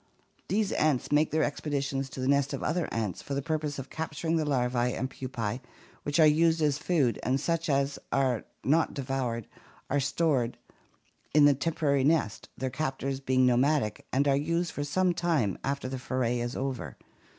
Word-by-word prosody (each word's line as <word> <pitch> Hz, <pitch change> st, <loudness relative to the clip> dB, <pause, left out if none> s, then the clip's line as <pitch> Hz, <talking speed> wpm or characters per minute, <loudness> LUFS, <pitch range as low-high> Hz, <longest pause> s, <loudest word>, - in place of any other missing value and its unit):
These 210 Hz, 0 st, +1 dB
ants 150 Hz, -5 st, +1 dB
make 150 Hz, +1 st, +4 dB
their 155 Hz, 0 st, +1 dB
expeditions 140 Hz, -2 st, -2 dB
to 130 Hz, -, -9 dB
the 130 Hz, -, -1 dB
nest 140 Hz, 0 st, +2 dB
of -, -, -4 dB
other 165 Hz, +2 st, 0 dB
ants 110 Hz, -6 st, -2 dB
for 140 Hz, -, -4 dB
the 140 Hz, -, 0 dB
purpose 155 Hz, -2 st, -2 dB
of 135 Hz, -1 st, -7 dB
capturing 160 Hz, +1 st, -2 dB
the 160 Hz, -2 st, +1 dB
larvae 125 Hz, -3 st, +1 dB
and 130 Hz, -, -2 dB
pupae 125 Hz, -3 st, -4 dB, 0.4 s
which 145 Hz, +2 st, -1 dB
are 160 Hz, -, +8 dB
used 160 Hz, +2 st, +4 dB
as 150 Hz, -2 st, +1 dB
food, 150 Hz, -9 st, +1 dB
and 130 Hz, +2 st, +1 dB
such 165 Hz, +2 st, -1 dB
as 140 Hz, 0 st, +1 dB
are 130 Hz, -4 st, +1 dB, 0.2 s
not 160 Hz, +5 st, +2 dB
devoured 130 Hz, -4 st, -2 dB, 0.5 s
are 145 Hz, -, +3 dB
stored 140 Hz, -4 st, +1 dB, 0.8 s
in 150 Hz, -1 st, +7 dB
the 145 Hz, -, +7 dB
temporary 140 Hz, -1 st, 0 dB
nest, 145 Hz, -8 st, +1 dB
their 130 Hz, -1 st, -2 dB
captors 135 Hz, -1 st, -2 dB
being 130 Hz, -1 st, +2 dB
nomadic, 125 Hz, -2 st, +2 dB
and 140 Hz, +2 st, +2 dB
are 140 Hz, -, +4 dB
used 170 Hz, +4 st, 0 dB
for 145 Hz, -, -3 dB
some 180 Hz, +5 st, +1 dB
time 165 Hz, -, 0 dB
after 140 Hz, -1 st, -2 dB
the 130 Hz, 0 st, -4 dB
foray 125 Hz, -2 st, -1 dB
is 120 Hz, +1 st, -3 dB
over. 125 Hz, -, -4 dB
140 Hz, 180 wpm, -29 LUFS, 130-155 Hz, 0.8 s, are